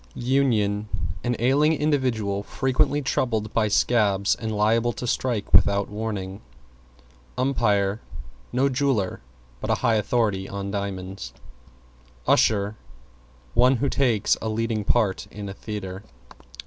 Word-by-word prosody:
=UNION= 110 Hz, -6 st, +1 dB, 0.3 s
An 120 Hz, 0 st, 0 dB
ailing 140 Hz, +6 st, +3 dB
individual 125 Hz, -10 st, 0 dB
frequently 135 Hz, +6 st, 0 dB
troubled 110 Hz, -5 st, -1 dB
by 110 Hz, -2 st, +2 dB
scabs 105 Hz, -2 st, +2 dB
and 110 Hz, -1 st, -4 dB
liable 115 Hz, +3 st, +2 dB
to 125 Hz, -, -6 dB
strike 120 Hz, -3 st, -1 dB
without 100 Hz, 0 st, +4 dB
warning. 105 Hz, -2 st, -4 dB, 1.0 s
=UMPIRE= 105 Hz, -6 st, +1 dB, 0.5 s
No 130 Hz, +3 st, +2 dB
jeweler, 130 Hz, -, 0 dB, 0.4 s
but -, -, -5 dB
a -, -, +3 dB
high 115 Hz, -3 st, +1 dB
authority 105 Hz, -3 st, 0 dB
on 100 Hz, 0 st, -4 dB
diamonds. 95 Hz, -1 st, -5 dB, 0.9 s
=USHER= 105 Hz, 0 st, +3 dB, 0.8 s
One 125 Hz, +2 st, +5 dB
who 140 Hz, +3 st, 0 dB
takes 120 Hz, -7 st, +2 dB
a 110 Hz, -, -2 dB
leading 110 Hz, -1 st, -1 dB
part 105 Hz, -3 st, +1 dB
in 105 Hz, 0 st, -7 dB
a 95 Hz, -, -5 dB
theatre. 100 Hz, -3 st, -6 dB
110 Hz, 120 wpm, -24 LUFS, 100-125 Hz, 1.0 s, One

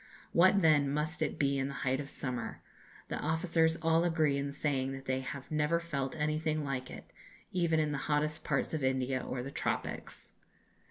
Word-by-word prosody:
What, 185 Hz, +2 st, +5 dB
then, 150 Hz, -3 st, +5 dB
must 150 Hz, +4 st, -1 dB
it 155 Hz, -, 0 dB
be 140 Hz, -1 st, +2 dB
in 135 Hz, -, 0 dB
the 140 Hz, -, -5 dB
height 130 Hz, +1 st, +2 dB
of 145 Hz, -1 st, -5 dB
summer! 125 Hz, -5 st, -4 dB, 0.5 s
The -, -, -2 dB
officers 160 Hz, +1 st, +2 dB
all 165 Hz, +1 st, +4 dB
agree 160 Hz, -4 st, +2 dB
in 140 Hz, 0 st, -2 dB
saying 135 Hz, -2 st, -1 dB
that 135 Hz, 0 st, -8 dB
they 130 Hz, 0 st, 0 dB
have 130 Hz, +2 st, -7 dB
never 155 Hz, +2 st, +2 dB
felt 140 Hz, -6 st, -3 dB
anything 155 Hz, 0 st, 0 dB
like 130 Hz, -2 st, -3 dB
it, -, -, -10 dB, 0.4 s
even 170 Hz, -3 st, +2 dB
in 155 Hz, -1 st, +1 dB
the 145 Hz, -, -2 dB
hottest 150 Hz, +1 st, +1 dB
parts -, -, 0 dB
of 155 Hz, -3 st, -1 dB
India 130 Hz, 0 st, +1 dB
or 125 Hz, -1 st, -3 dB
the 135 Hz, -, -6 dB
tropics.... -, -, -3 dB
150 Hz, 185 wpm, -32 LUFS, 135-160 Hz, 0.5 s, What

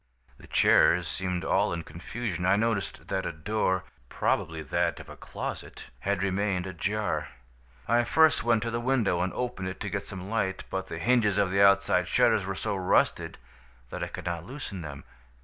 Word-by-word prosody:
"The -, -, -14 dB
chairs 90 Hz, -1 st, +4 dB
seemed 90 Hz, +2 st, -3 dB
all -, -, +2 dB
in 85 Hz, -1 st, -3 dB
confusion. 90 Hz, +3 st, -5 dB
I 95 Hz, +2 st, +4 dB
noticed 110 Hz, -2 st, -1 dB
that 95 Hz, -, -1 dB
a -, -, -2 dB
door, 95 Hz, +3 st, -1 dB, 0.3 s
probably 80 Hz, 0 st, -1 dB
that 70 Hz, -, 0 dB
of -, -, -11 dB
a -, -, -9 dB
closet, -, -, -7 dB
had 100 Hz, -1 st, -1 dB
remained 95 Hz, -1 st, 0 dB
ajar. 100 Hz, +4 st, -2 dB, 0.6 s
"I 120 Hz, +2 st, +3 dB
first 160 Hz, +4 st, +4 dB
went 115 Hz, -2 st, +2 dB
to 115 Hz, -, -2 dB
the 115 Hz, -, -1 dB
window 120 Hz, -8 st, +1 dB
and 90 Hz, -, 0 dB
opened 125 Hz, -7 st, -3 dB
it 95 Hz, -, -6 dB
to -, -, -3 dB
get -, -, -3 dB
some 95 Hz, -1 st, -7 dB
light, 100 Hz, -3 st, -1 dB
but 95 Hz, 0 st, -3 dB
the 85 Hz, -, -6 dB
hinges 110 Hz, 0 st, +2 dB
of 100 Hz, -2 st, +2 dB
the 100 Hz, +1 st, +2 dB
outside 100 Hz, -2 st, +4 dB
shutters 110 Hz, -5 st, +3 dB
were 95 Hz, -, -2 dB
so 105 Hz, +2 st, -2 dB
rusted 95 Hz, -1 st, +1 dB, 0.5 s
that -, -, -4 dB
I -, -, -2 dB
could -, -, -8 dB
not 85 Hz, -1 st, -3 dB
loosen 115 Hz, -5 st, -7 dB
them. 70 Hz, -3 st, -8 dB
95 Hz, 185 wpm, -28 LUFS, 90-110 Hz, 0.6 s, chairs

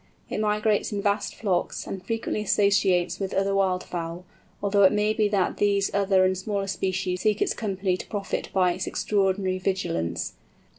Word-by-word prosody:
It -, -, -2 dB
migrates 210 Hz, 0 st, +1 dB
in 205 Hz, -, -2 dB
vast 205 Hz, 0 st, 0 dB
flocks, 190 Hz, -5 st, -1 dB
and 190 Hz, -1 st, -6 dB
frequently 225 Hz, +1 st, -2 dB
associates 195 Hz, -4 st, +2 dB
with 195 Hz, -2 st, -3 dB
other 195 Hz, +1 st, +1 dB
wild 190 Hz, -2 st, +1 dB
fowl, 170 Hz, +1 st, -5 dB, 0.3 s
although 200 Hz, 0 st, +2 dB
it 190 Hz, -, +7 dB
may 210 Hz, +1 st, +2 dB
be 215 Hz, -1 st, +2 dB
that 200 Hz, -3 st, 0 dB
these 200 Hz, -1 st, +1 dB
other 195 Hz, -1 st, +3 dB
and 185 Hz, 0 st, +2 dB
smaller 200 Hz, +1 st, -2 dB
species 185 Hz, -1 st, -2 dB
seek 215 Hz, 0 st, +2 dB
its -, -, +1 dB
company 195 Hz, -3 st, -1 dB
to -, -, -8 dB
profit 200 Hz, -2 st, -3 dB
by 180 Hz, -2 st, +3 dB
its -, -, -4 dB
extraordinary 190 Hz, -2 st, 0 dB
vigilance. 180 Hz, -, -2 dB
195 Hz, 170 wpm, -26 LUFS, 185-205 Hz, 0.3 s, it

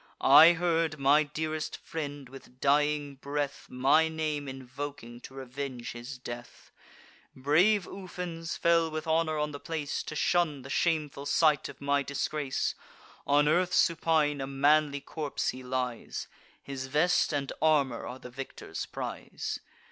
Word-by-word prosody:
I 155 Hz, +5 st, +9 dB
heard 165 Hz, -2 st, 0 dB
my 140 Hz, +2 st, +5 dB
dearest 155 Hz, +1 st, -3 dB
friend, 145 Hz, -4 st, -6 dB
with 130 Hz, -1 st, -14 dB
dying 145 Hz, 0 st, +2 dB
breath, 145 Hz, +1 st, -3 dB
My 135 Hz, +6 st, +4 dB
name 155 Hz, -2 st, -2 dB
invoking 130 Hz, -2 st, -7 dB
to 130 Hz, -, -11 dB
revenge 130 Hz, -2 st, -5 dB
his 120 Hz, +3 st, -7 dB
death. 120 Hz, -1 st, -9 dB, 0.6 s
Brave 170 Hz, +10 st, +3 dB
Ufens 180 Hz, -3 st, -6 dB
fell 170 Hz, -1 st, +3 dB
with 155 Hz, 0 st, -4 dB
honour 160 Hz, -1 st, +1 dB
on 150 Hz, 0 st, -1 dB
the 145 Hz, -, -7 dB
place, 155 Hz, -3 st, -3 dB
To 155 Hz, -, -7 dB
shun 155 Hz, -4 st, +1 dB
the 135 Hz, -, -8 dB
shameful 150 Hz, -4 st, 0 dB
sight 150 Hz, +1 st, +3 dB
of -, -, -11 dB
my 140 Hz, 0 st, +1 dB
disgrace. 140 Hz, 0 st, -2 dB, 0.5 s
On 145 Hz, +1 st, +4 dB
earth 180 Hz, +3 st, +2 dB
supine, 155 Hz, -4 st, +2 dB
a 135 Hz, -, -3 dB
manly 140 Hz, +1 st, +3 dB
corpse 150 Hz, 0 st, -3 dB
he 130 Hz, -, -5 dB
lies; 125 Hz, -2 st, -3 dB, 0.4 s
His 135 Hz, -1 st, -5 dB
vest 155 Hz, +7 st, +2 dB
and 140 Hz, -2 st, -2 dB
armour 145 Hz, -6 st, +2 dB
are 125 Hz, -, -6 dB
the 125 Hz, -1 st, -11 dB
victor's 135 Hz, +2 st, -6 dB
prize. -, -, -5 dB
145 Hz, 140 wpm, -29 LUFS, 135-160 Hz, 0.6 s, I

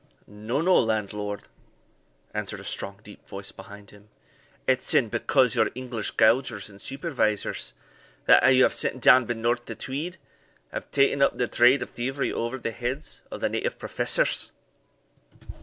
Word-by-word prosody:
"No, 110 Hz, +7 st, -3 dB
no, 185 Hz, +2 st, +5 dB
landlord," 105 Hz, -2 st, -2 dB, 0.9 s
answered -, -, -4 dB
a -, -, -10 dB
strong 100 Hz, 0 st, -3 dB
deep 105 Hz, -, -14 dB
voice 100 Hz, 0 st, -7 dB
behind 100 Hz, +1 st, -12 dB
him, 105 Hz, 0 st, -18 dB, 0.6 s
"it's 130 Hz, -1 st, +1 dB
e'en 115 Hz, -, +4 dB
because 125 Hz, +1 st, +2 dB
your 110 Hz, -2 st, +2 dB
English 125 Hz, -4 st, -4 dB
gaugers 110 Hz, -2 st, +3 dB
and 100 Hz, 0 st, -15 dB
supervisors,* 125 Hz, -, -2 dB, 0.5 s
that -, -, +6 dB
you 130 Hz, -1 st, +6 dB
have -, -, +3 dB
sent 130 Hz, -, 0 dB
down 125 Hz, 0 st, +6 dB
benorth 120 Hz, +1 st, -1 dB
the 115 Hz, -, -6 dB
Tweed, 155 Hz, +11 st, -5 dB, 0.5 s
have -, -, -6 dB
taen 140 Hz, 0 st, +2 dB
up 140 Hz, -, +3 dB
the 125 Hz, -, 0 dB
trade 125 Hz, +3 st, +4 dB
of -, -, -11 dB
thievery 135 Hz, +3 st, -2 dB
over 120 Hz, +3 st, -2 dB
the 115 Hz, -2 st, -4 dB
heads 125 Hz, +6 st, -5 dB
of -, -, -7 dB
the -, -, +1 dB
native -, -, -2 dB
professors." -, -, 0 dB
120 Hz, 155 wpm, -26 LUFS, 105-130 Hz, 0.9 s, that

